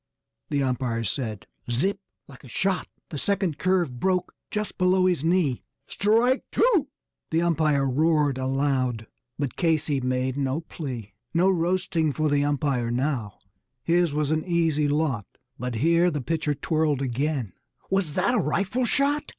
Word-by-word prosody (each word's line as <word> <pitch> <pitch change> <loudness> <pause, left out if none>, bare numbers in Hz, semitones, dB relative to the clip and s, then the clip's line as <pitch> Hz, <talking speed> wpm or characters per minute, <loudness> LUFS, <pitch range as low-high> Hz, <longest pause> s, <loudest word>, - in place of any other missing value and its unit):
the 140 -1 +1
umpire 125 -3 -1
said. 110 -2 -3 0.2
Zip! 190 +12 +1 0.3
Like 135 -2 -14
a - - -11
shot, 190 +9 -1 0.2
the 150 - -4
second 195 -5 0
curve 175 -9 +1
broke 185 +2 0 0.2
just 210 -1 -4
below 185 0 +4
his 180 -5 +1
knee 165 -7 +2 0.2
"Strike 230 +6 +2
two!" 400 - +3 0.4
the 165 +1 +1
umpire 155 -5 +2
roared 145 0 +2
aloud; 130 -3 0 0.3
but 145 -3 -3
Casey 155 -5 +1
made 130 +1 -1
no 140 +2 -1
plea. 125 - -7 0.2
No 185 +3 +4
roasting 170 -3 +1
for 155 +3 0
the 145 0 +3
umpire 140 -4 0
now 120 -4 -1 0.5
his 170 -1 +2
was 150 0 0
an 155 0 +1
easy 165 -4 +1
lot. 145 -8 0 0.3
But 125 0 -3
here 170 +8 +3
the 150 -3 -2
pitcher 155 +2 -1
twirled 155 -2 0
again 130 - -1 0.4
was 190 -6 0
that 190 +7 +2
a 245 - +3
rifle 195 - 0
shot? 280 +4 +1
150 Hz, 150 wpm, -25 LUFS, 130-180 Hz, 0.5 s, below